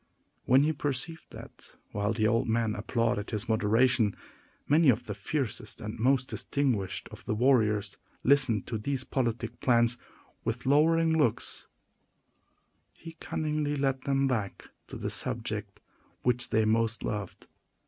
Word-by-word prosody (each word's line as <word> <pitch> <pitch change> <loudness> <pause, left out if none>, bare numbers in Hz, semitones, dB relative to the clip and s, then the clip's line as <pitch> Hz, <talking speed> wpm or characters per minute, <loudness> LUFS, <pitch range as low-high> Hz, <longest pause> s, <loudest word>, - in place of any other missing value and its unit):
When 130 +3 +5
he 155 +1 +1
perceived 145 +3 -3
that, - - -13 0.2
while 105 +1 -1
the 110 -1 +1
old 115 +2 +1
men 115 -1 +1
applauded 115 0 -1
his 110 0 -3
moderation, 110 0 +2 0.5
many 150 +1 +5
of 120 0 +3
the 105 - -4
fiercest 110 0 -3
and 105 +2 -6
most 130 +2 +2
distinguished 120 -10 -1
of - - -11
the 110 - -1
warriors 110 -4 +2 0.3
listened 130 -7 +3
to 115 -2 -4
these 135 +4 -2
politic 120 -2 -2
plans 120 -1 +3 0.4
with 115 +3 -3
lowering 160 +4 +4
looks, 145 -8 0 1.3
he 165 - -11
cunningly 150 -1 -2
led 135 -2 0
them 135 0 +1
back 110 -7 -3 0.2
to - - -9
the - - -3
subject - - -2 0.4
which 120 -1 +1
they 110 0 +2
most 115 +1 +1
loved. 105 -3 -5
120 Hz, 140 wpm, -29 LUFS, 110-140 Hz, 1.3 s, When